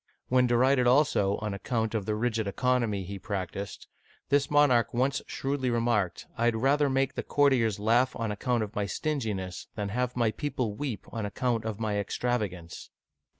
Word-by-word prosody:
'* - - -53
When 125 0 +4
derided, 125 +1 +3
also, 125 -7 +3
on 105 -1 -2
account 110 +2 -2
of 105 -4 -2
the 105 - 0
rigid 110 -1 -1
economy 115 -2 0
he 100 +2 -7
practiced, 100 -1 -5 0.4
this 145 0 +2
monarch 145 -6 +3
once 130 +3 +1
shrewdly 135 -1 -2
remarked, 115 -6 0
" - - -30
I 115 - +2
had 120 -1 +3
rather 140 +5 +2
make 135 0 +1
the - - -3
court 145 -1 +3
iers 115 -5 +1
laugh 115 +5 +2
on 115 -2 -2
account 115 +3 0
of 105 +1 -7
my 105 -2 -1
stinginess, 105 -8 -3
than 105 -2 -3
have 125 +3 -2
my 115 -2 +2
people 125 -3 -2
weep 120 -1 -4
on 115 - -3
account 115 +2 -1
of 110 -1 -4
my 105 -2 -1
extravagance 100 -5 -3
115 Hz, 185 wpm, -28 LUFS, 105-130 Hz, 0.4 s, When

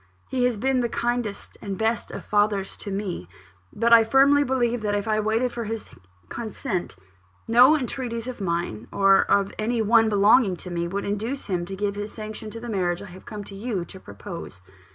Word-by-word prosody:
He 255 -1 +1
has 245 -3 +1
been 260 +4 +1
the 235 - 0
kindest 235 -4 -2
and 195 -2 -4
best 225 0 0
of - - -8
fathers 205 -2 +1
to 205 - -7
me; 195 - -4 0.4
but 235 +1 +2
I 230 -1 +9
firmly 275 +5 +5
believe, 245 -3 0
that 205 -1 0
if 205 +1 -2
I 215 0 +2
waited 225 +4 +1
for 235 -1 -4
his 225 0 -5 0.4
consent, 215 - -4 0.5
no 250 +7 +7
entreaties 245 -3 -4
of 255 -4 -6
mine, 170 - -2
or 195 -1 +5
of 200 -1 +2
any 230 +2 0
one 225 +1 +4
belonging 205 0 +4
to 180 +1 -9
me, 170 0 -1
would 200 +3 -3
induce 220 +7 -3
him 180 -4 -2
to 195 +2 -6
give 200 +1 -1
his 205 +1 -5
sanction 215 0 -7
to 230 - -8
the 240 - -8
marriage 185 -4 -1
I 205 - -10
have 185 - -14
come 210 -1 -6
to 195 - -11
you 200 -4 -3
to 190 - -11
propose." 170 - -9
215 Hz, 200 wpm, -24 LUFS, 195-235 Hz, 0.5 s, I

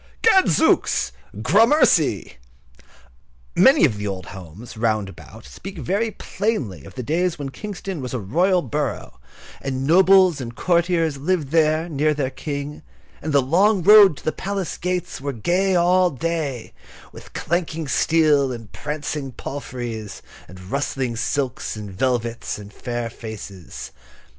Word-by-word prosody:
Gadzooks, 375 - +3 0.3
gramercy." 200 - +3 1.2
Many 265 - +6
of 110 -8 -1
the 105 - -3
old 95 -2 -5
houses, 95 +4 -10
round 110 -3 0
about, 105 +4 -13
speak 195 -1 -9
very 195 - -1
plainly 180 - -3
of - - -13
those 125 -2 -5
days 175 +4 0
when 140 -2 -5
Kingston 195 - -6
was 125 - -5
a 125 - -2
royal 175 - +1
borough, 145 - -4 0.4
and 135 -1 -3
nobles 185 -1 +5
and 120 -1 -7
courtiers 170 -3 +1
lived 160 -1 -1
there, 160 +1 +2
near 150 -1 +1
their 135 -2 -2
King, 145 +1 -5 0.4
and 155 - -3
the 140 -2 +4
long 185 +7 +3
road 205 -5 +8
to - - -13
the 155 - +1
palace 195 +3 -4
gates 180 -5 -3
was 140 -1 -3
gay 190 +2 +2
all 180 +1 +4
day 145 -4 -3 0.4
with - - -14
clanking 165 -2 -2
steel 145 -1 +3
and 115 -4 -8
prancing 145 -1 -4
palfreys, 120 -6 -6 0.2
and 90 +1 -12
rustling 135 -3 -2
silks 130 +2 -2
and 105 -2 -7
velvets, 120 +2 -2
and 105 0 -11
fair 120 +1 -4
faces. 110 -5 -9
145 Hz, 140 wpm, -22 LUFS, 120-175 Hz, 1.2 s, road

